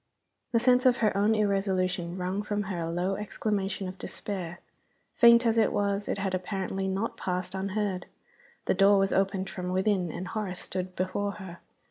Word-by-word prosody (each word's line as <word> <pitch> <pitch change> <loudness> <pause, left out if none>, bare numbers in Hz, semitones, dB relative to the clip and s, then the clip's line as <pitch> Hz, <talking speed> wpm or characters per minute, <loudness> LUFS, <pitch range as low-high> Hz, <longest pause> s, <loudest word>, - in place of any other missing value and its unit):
The 230 - +3
sense 250 +1 +4
of 250 -1 +4
her 215 -3 +2
own 205 +2 +3
irresolution 190 -4 0
wrung 185 +2 -2
from 210 0 -2
her 190 -3 -4
a 165 0 -2
low 180 +3 -1
exclamation 200 -2 -2
of 185 +1 -8
despair. 175 -4 -5 0.5
Faint 235 0 +7
as 230 0 +3
it 220 - +3
was, 200 0 0
it - - -1
had 195 -1 -2
apparently 190 +1 -2
not 195 +4 -2
passed 180 0 -3
unheard. 195 -1 -2 0.6
The - - +2
door 200 +1 +5
was 195 0 +2
opened 195 0 +1
from 180 -1 -5
within 185 -2 +1
and 180 +3 -5
Horace 200 -4 -3
stood 185 0 -4
before 200 +2 -1
her. 190 -4 -9
195 Hz, 175 wpm, -28 LUFS, 185-205 Hz, 0.6 s, Faint